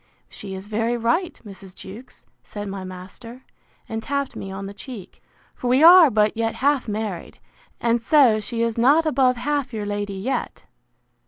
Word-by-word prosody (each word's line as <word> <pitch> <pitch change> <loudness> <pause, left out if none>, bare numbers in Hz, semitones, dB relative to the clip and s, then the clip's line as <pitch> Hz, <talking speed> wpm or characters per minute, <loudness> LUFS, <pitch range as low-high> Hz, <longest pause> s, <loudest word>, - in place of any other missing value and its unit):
—She 195 -2 -8
is 190 +1 -8
very 225 +3 -1
right, 240 +11 -1
Mrs. 195 -2 -10
Jewkes, 215 - -12 0.2
said 205 - -7
my 195 -1 -6
master, 185 +7 -10 0.4
and 225 0 -4
tapped 280 +3 -3
me 195 - -7
on 195 +1 -6
the 200 - -7
cheek; 210 -2 -11 0.3
for 250 - -5
we 255 +5 +3
are 345 -2 +9
but 215 -2 +2
yet 225 0 -1
half 280 -1 +1
married; 210 -4 -5 0.4
and 235 0 +1
so 245 -4 +4
she 230 +2 -3
is 230 0 -1
not 290 +7 +4
above 255 -4 +2
half 280 +1 -2
your 215 -2 -4
lady 205 -1 -3
yet! 220 +8 -4
230 Hz, 170 wpm, -22 LUFS, 205-255 Hz, 0.4 s, are